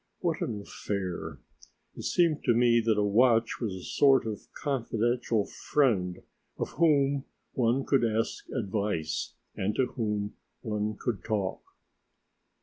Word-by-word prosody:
What 170 Hz, -3 st, -1 dB
an 110 Hz, -3 st, -2 dB
affair! 90 Hz, -7 st, -4 dB, 0.6 s
It -, -, -7 dB
seemed 165 Hz, -4 st, +2 dB
to 120 Hz, -, +4 dB
me 120 Hz, 0 st, +4 dB
that 110 Hz, -2 st, +2 dB
a 105 Hz, -, +3 dB
watch 115 Hz, +2 st, +3 dB
was 105 Hz, -5 st, -2 dB
a 90 Hz, -, -8 dB
sort 135 Hz, -3 st, +4 dB
of 110 Hz, -2 st, -5 dB
confidential 120 Hz, -4 st, 0 dB
friend 100 Hz, -11 st, 0 dB, 0.3 s
of -, -, -2 dB
whom 140 Hz, -4 st, +3 dB, 0.3 s
one 125 Hz, +1 st, +1 dB
could 135 Hz, -3 st, +3 dB
ask 115 Hz, 0 st, -1 dB
advice 100 Hz, -7 st, -2 dB, 0.2 s
and 105 Hz, +3 st, -1 dB
to 130 Hz, -, +3 dB
whom 105 Hz, -3 st, -2 dB, 0.3 s
one 105 Hz, -1 st, -2 dB
could 120 Hz, -5 st, -2 dB
talk. 100 Hz, -3 st, -1 dB
115 Hz, 135 wpm, -29 LUFS, 105-130 Hz, 0.6 s, to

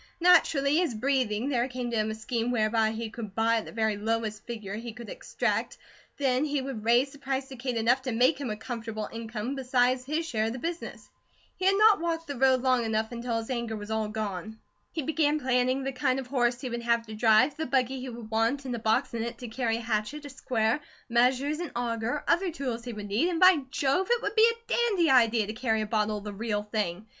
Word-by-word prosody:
Naturally 315 Hz, -3 st, +4 dB
as 310 Hz, -10 st, -1 dB
breathing, 255 Hz, -1 st, 0 dB
there 245 Hz, -3 st, +1 dB
came 250 Hz, -2 st, -4 dB
to -, -, -1 dB
him 215 Hz, 0 st, +1 dB
a 215 Hz, -, -3 dB
scheme 230 Hz, +1 st, -2 dB
whereby 220 Hz, -2 st, +2 dB
he 225 Hz, 0 st, -4 dB
could 215 Hz, -4 st, -7 dB
buy 230 Hz, +1 st, +3 dB
at 220 Hz, -, -3 dB
the -, -, -9 dB
very 220 Hz, -2 st, 0 dB
lowest 220 Hz, 0 st, -2 dB
figure 215 Hz, -5 st, -6 dB
he 225 Hz, +2 st, -6 dB
could 235 Hz, -2 st, -10 dB
extract; -, -, -2 dB, 0.4 s
then 265 Hz, -1 st, +1 dB
he 295 Hz, -1 st, 0 dB
would 260 Hz, -5 st, -5 dB
raise 240 Hz, +4 st, +3 dB
the 285 Hz, -, -14 dB
price 270 Hz, 0 st, -3 dB
to 265 Hz, -, -8 dB
Kate 250 Hz, -1 st, -3 dB
enough 240 Hz, +4 st, +3 dB
to 255 Hz, -1 st, -3 dB
make 250 Hz, +7 st, +3 dB
him 265 Hz, -, -3 dB
a 210 Hz, -, -3 dB
comfortable 225 Hz, -2 st, -5 dB
income 230 Hz, +2 st, -4 dB
besides 255 Hz, -1 st, +1 dB
his 305 Hz, +5 st, -2 dB
share 220 Hz, -7 st, 0 dB
of 225 Hz, -, -3 dB
the -, -, -5 dB
business. 335 Hz, +6 st, -5 dB, 0.5 s
He 370 Hz, -, -4 dB
had 390 Hz, +1 st, +4 dB
not 425 Hz, -3 st, +6 dB
walked 330 Hz, -1 st, -2 dB
the 285 Hz, -, -5 dB
road 260 Hz, 0 st, +3 dB
long 255 Hz, -2 st, +3 dB
until 230 Hz, +2 st, -2 dB
his 225 Hz, +3 st, -4 dB
anger 235 Hz, -3 st, -2 dB
was 210 Hz, 0 st, -7 dB
all 220 Hz, -1 st, 0 dB
gone. 215 Hz, -1 st, -4 dB, 0.3 s
He 320 Hz, -, -3 dB
began 305 Hz, 0 st, +1 dB
planning 255 Hz, 0 st, +1 dB
the 270 Hz, -, -2 dB
kind 255 Hz, 0 st, 0 dB
of 265 Hz, -, -5 dB
horse 245 Hz, -2 st, +1 dB
he 260 Hz, -, -4 dB
would 235 Hz, 0 st, -3 dB
have 235 Hz, 0 st, +1 dB
to 220 Hz, -, -9 dB
drive, 220 Hz, +5 st, +4 dB
the 315 Hz, -, -3 dB
buggy 260 Hz, 0 st, +1 dB
he 255 Hz, 0 st, -6 dB
would 230 Hz, -2 st, -9 dB
want, 230 Hz, +5 st, +1 dB
and 255 Hz, -, -3 dB
a -, -, -4 dB
box 220 Hz, +1 st, +1 dB
in 230 Hz, -, -2 dB
it 235 Hz, +1 st, -4 dB
to 245 Hz, -, -7 dB
carry 225 Hz, -1 st, -1 dB
a -, -, -5 dB
hatchet, 230 Hz, +6 st, -2 dB
a 285 Hz, -, -8 dB
square, 235 Hz, -1 st, 0 dB, 0.3 s
measures, 255 Hz, +5 st, +2 dB
an 350 Hz, -3 st, -4 dB
auger, 235 Hz, +3 st, -2 dB
other 365 Hz, +2 st, +2 dB
tools 255 Hz, -7 st, -4 dB
he 245 Hz, -, -4 dB
would 210 Hz, -1 st, -6 dB
need, 240 Hz, -, +2 dB
and 340 Hz, -2 st, -1 dB
by 370 Hz, -1 st, +7 dB
Jove! 285 Hz, +8 st, +1 dB
it 480 Hz, -1 st, +2 dB
would 410 Hz, -, -1 dB
be 445 Hz, +1 st, +6 dB
a 465 Hz, 0 st, -6 dB
dandy 400 Hz, -, +2 dB
idea 230 Hz, -4 st, +4 dB
to 215 Hz, -, -5 dB
carry 225 Hz, -2 st, 0 dB
a -, -, -1 dB
bottle 215 Hz, 0 st, 0 dB
of 205 Hz, -, -8 dB
the 210 Hz, -1 st, -6 dB
real 210 Hz, 0 st, -2 dB
thing. 210 Hz, -2 st, -3 dB
240 Hz, 240 wpm, -28 LUFS, 220-275 Hz, 0.5 s, by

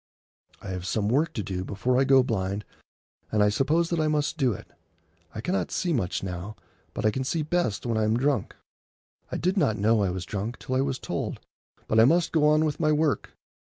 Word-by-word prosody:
I 100 Hz, -, -6 dB
have 90 Hz, -1 st, -4 dB
some 105 Hz, 0 st, 0 dB
work 145 Hz, +7 st, +2 dB
to 105 Hz, -, -3 dB
do 90 Hz, -1 st, -3 dB
before 120 Hz, +7 st, 0 dB
I 135 Hz, -, +3 dB
go 135 Hz, -1 st, +6 dB
blind, 100 Hz, -3 st, -2 dB, 0.7 s
and 105 Hz, -1 st, +3 dB
I 105 Hz, -, +4 dB
suppose 160 Hz, +10 st, +1 dB
that 170 Hz, -, +1 dB
I 155 Hz, -, +2 dB
must 150 Hz, 0 st, 0 dB
do 135 Hz, -6 st, +2 dB
it. 100 Hz, -, -7 dB, 0.7 s
I 110 Hz, -, -4 dB
cannot 185 Hz, +10 st, -1 dB
see 175 Hz, -3 st, -1 dB
much 95 Hz, -, -1 dB
now, 95 Hz, +3 st, -5 dB, 0.4 s
but -, -, -2 dB
I 110 Hz, -, +4 dB
can 130 Hz, +4 st, -2 dB
see 155 Hz, +4 st, -1 dB
best 160 Hz, -, -1 dB
when 115 Hz, -2 st, 0 dB
I -, -, +2 dB
am 110 Hz, +2 st, +2 dB
drunk. 135 Hz, -4 st, 0 dB, 0.8 s
I -, -, -2 dB
did 185 Hz, +4 st, 0 dB
not 110 Hz, -, +2 dB
know 110 Hz, +2 st, +3 dB
I 100 Hz, -, +1 dB
was 90 Hz, 0 st, -4 dB
drunk 105 Hz, +5 st, -4 dB
till 130 Hz, -, -6 dB
I 130 Hz, -, +2 dB
was 135 Hz, -1 st, -1 dB
told, -, -, -4 dB, 0.5 s
but 110 Hz, -, +3 dB
I 110 Hz, -, +8 dB
must 170 Hz, +6 st, +3 dB
go 155 Hz, -2 st, +3 dB
on 155 Hz, +1 st, +4 dB
with 150 Hz, -1 st, -2 dB
my 155 Hz, -2 st, +2 dB
work. 150 Hz, -1 st, 0 dB
125 Hz, 225 wpm, -26 LUFS, 105-150 Hz, 0.8 s, I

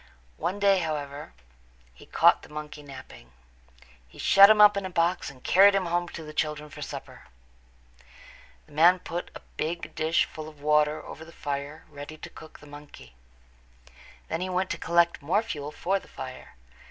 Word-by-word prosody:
One 185 Hz, +3 st, -2 dB
day, 200 Hz, -2 st, +4 dB
however, 150 Hz, -3 st, -5 dB, 0.6 s
he -, -, -17 dB
caught -, -, +4 dB
the -, -, -15 dB
monkey 150 Hz, 0 st, -8 dB
napping. 130 Hz, -, -13 dB, 0.7 s
He 60 Hz, -, -19 dB
shut 200 Hz, +1 st, +7 dB
him 215 Hz, -1 st, +5 dB
up 210 Hz, -1 st, +8 dB
in 200 Hz, -, -2 dB
a 190 Hz, -, -4 dB
box 170 Hz, 0 st, 0 dB
and 130 Hz, -2 st, -15 dB
carried 195 Hz, +2 st, +6 dB
him 195 Hz, -2 st, +1 dB
home 175 Hz, +1 st, -1 dB
to 165 Hz, -, -8 dB
the 155 Hz, 0 st, -10 dB
children 150 Hz, -1 st, -3 dB
for -, -, -10 dB
supper. -, -, -8 dB, 1.4 s
The -, -, -23 dB
man 170 Hz, +5 st, +5 dB
put 175 Hz, -1 st, -6 dB
a -, -, -9 dB, 0.2 s
big 165 Hz, +2 st, -4 dB
dish 160 Hz, +1 st, +1 dB
full 155 Hz, 0 st, -9 dB
of 150 Hz, -2 st, -18 dB
water 150 Hz, +1 st, +1 dB
over 160 Hz, -, -9 dB
the 165 Hz, -, -13 dB
fire 145 Hz, 0 st, -5 dB
ready 145 Hz, 0 st, -10 dB
to -, -, -10 dB
cook 155 Hz, -, -13 dB
the -, -, -14 dB
monkey. 145 Hz, -, -13 dB, 1.1 s
Then 160 Hz, -, -3 dB
he 185 Hz, -, -3 dB
went 185 Hz, +1 st, -1 dB
away -, -, -8 dB
to -, -, -8 dB
collect 170 Hz, 0 st, +3 dB
more 180 Hz, +10 st, +1 dB
fuel 150 Hz, -9 st, -6 dB
for 190 Hz, +6 st, -1 dB
the -, -, -18 dB
fire. 130 Hz, -1 st, -10 dB
155 Hz, 185 wpm, -27 LUFS, 145-180 Hz, 1.4 s, up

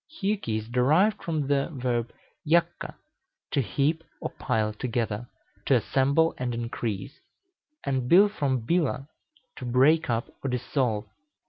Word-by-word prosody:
Hjuki 200 Hz, -, -1 dB
is 110 Hz, 0 st, -5 dB
derived 155 Hz, -, +3 dB
from 155 Hz, -4 st, -1 dB
the 140 Hz, +1 st, +1 dB
verb 120 Hz, -4 st, -1 dB, 0.3 s
jakka, 170 Hz, +2 st, +1 dB, 0.6 s
to 140 Hz, -, +2 dB
heap 145 Hz, -, 0 dB, 0.2 s
or -, -, -4 dB
pile 110 Hz, -4 st, 0 dB
together, 115 Hz, 0 st, -2 dB, 0.4 s
to -, -, +5 dB
assemble 140 Hz, +5 st, +2 dB
and 125 Hz, -2 st, -2 dB
increase; 115 Hz, -1 st, -4 dB, 0.6 s
and 130 Hz, -2 st, -1 dB
Bil 195 Hz, +4 st, +8 dB
from 140 Hz, -, -1 dB
bila, 155 Hz, -3 st, 0 dB, 0.5 s
to -, -, -8 dB
break 135 Hz, +6 st, +3 dB
up 115 Hz, 0 st, 0 dB, 0.2 s
or 135 Hz, -, -1 dB
dissolve. 125 Hz, -3 st, -1 dB
130 Hz, 130 wpm, -27 LUFS, 120-155 Hz, 0.6 s, Bil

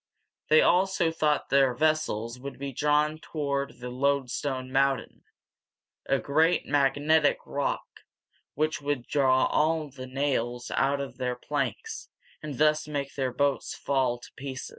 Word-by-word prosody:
They 155 Hz, +1 st, +6 dB
also 180 Hz, -2 st, +3 dB
thought 150 Hz, -2 st, 0 dB
their 135 Hz, -2 st, +4 dB
vessels 125 Hz, -6 st, 0 dB
would 140 Hz, +1 st, -7 dB
be 140 Hz, 0 st, -5 dB
drawn 150 Hz, +3 st, +1 dB
toward 140 Hz, -3 st, -3 dB
the 125 Hz, 0 st, -5 dB
"Loadstone 130 Hz, 0 st, -1 dB
Mountain," 135 Hz, 0 st, 0 dB, 0.8 s
a 135 Hz, -, +3 dB
great 160 Hz, +6 st, +2 dB
magnetic 145 Hz, +2 st, +3 dB
rock 140 Hz, 0 st, -2 dB, 0.7 s
which 155 Hz, +1 st, 0 dB
would 145 Hz, -4 st, -2 dB
draw 130 Hz, -3 st, +3 dB
all 155 Hz, 0 st, +1 dB
the 130 Hz, -1 st, -8 dB
nails 130 Hz, -3 st, -2 dB
out 140 Hz, +1 st, +1 dB
of 140 Hz, -, -7 dB
their 125 Hz, -1 st, -1 dB
planks, 145 Hz, -, -4 dB, 0.3 s
and 150 Hz, -4 st, -6 dB
thus 155 Hz, +1 st, +3 dB
make 140 Hz, -2 st, -3 dB
their 130 Hz, -2 st, -1 dB
boats 140 Hz, +1 st, 0 dB
fall 130 Hz, -3 st, 0 dB
to 120 Hz, -, -15 dB
pieces. 135 Hz, -1 st, -6 dB
140 Hz, 140 wpm, -27 LUFS, 130-150 Hz, 0.8 s, They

